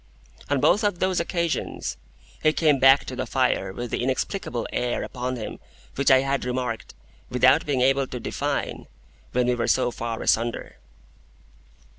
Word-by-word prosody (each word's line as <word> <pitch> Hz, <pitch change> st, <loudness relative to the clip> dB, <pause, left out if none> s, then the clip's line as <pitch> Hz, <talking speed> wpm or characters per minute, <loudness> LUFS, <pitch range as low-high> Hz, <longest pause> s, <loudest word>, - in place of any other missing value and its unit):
On 145 Hz, -1 st, +2 dB
both 205 Hz, -, +3 dB
of 205 Hz, -4 st, +1 dB
those 185 Hz, 0 st, +1 dB
occasions, 170 Hz, -1 st, -2 dB, 0.5 s
he 155 Hz, 0 st, +3 dB
came 150 Hz, -4 st, +3 dB
back 135 Hz, +1 st, +6 dB
to 130 Hz, -, -6 dB
the 130 Hz, 0 st, -3 dB
fire 125 Hz, -7 st, +1 dB
with 120 Hz, +4 st, -6 dB
the -, -, -1 dB
inexplicable 130 Hz, -, -2 dB
air 125 Hz, 0 st, -1 dB
upon 125 Hz, +1 st, -4 dB
him 110 Hz, -3 st, -6 dB, 0.3 s
which 140 Hz, -, +1 dB
I 130 Hz, 0 st, +6 dB
had 135 Hz, 0 st, -1 dB
remarked, 125 Hz, -2 st, -3 dB, 0.3 s
without 130 Hz, +5 st, +4 dB
being 135 Hz, -3 st, +1 dB
able 135 Hz, +1 st, +3 dB
to 125 Hz, -, -6 dB
define, -, -, -3 dB, 0.4 s
when 125 Hz, 0 st, +1 dB
we 125 Hz, -, +2 dB
were 120 Hz, -1 st, -1 dB
so 125 Hz, -2 st, +2 dB
far 115 Hz, -1 st, -4 dB
asunder. 115 Hz, +1 st, 0 dB
130 Hz, 160 wpm, -24 LUFS, 120-140 Hz, 0.5 s, back